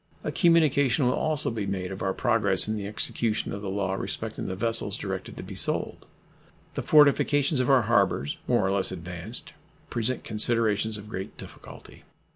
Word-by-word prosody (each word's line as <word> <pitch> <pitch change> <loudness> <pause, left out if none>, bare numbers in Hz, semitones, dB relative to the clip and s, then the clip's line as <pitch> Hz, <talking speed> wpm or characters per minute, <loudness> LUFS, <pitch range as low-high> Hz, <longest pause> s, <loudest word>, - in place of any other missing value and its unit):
A - - -2
communication 145 - +3
will 125 - +3
also 155 -3 +1
be 110 -3 -3
made 95 -1 -3
of 95 - -7
our 95 - 0
progress 115 -1 +2
in 110 - -1
the 100 -2 -4
execution 110 +1 -2
of 100 - -5
the 100 - -4
law 95 -1 -1
respecting 95 - -3
the 95 - -3
vessels 115 +3 +1
directed - - -5
to - - -6
be - - -9
sold. - - -3 0.7
The - - -3
fortifications 145 -1 +4
of 125 - +1
our 130 -3 +5
harbors, 105 - +1
more - - +2
or 95 - +1
less 100 -1 +1
advanced, 90 +5 -6 0.4
present 120 +1 -1
considerations 110 -1 +1
of 105 0 -10
great 95 -3 -6
difficulty. - - -12
110 Hz, 175 wpm, -26 LUFS, 100-125 Hz, 0.7 s, our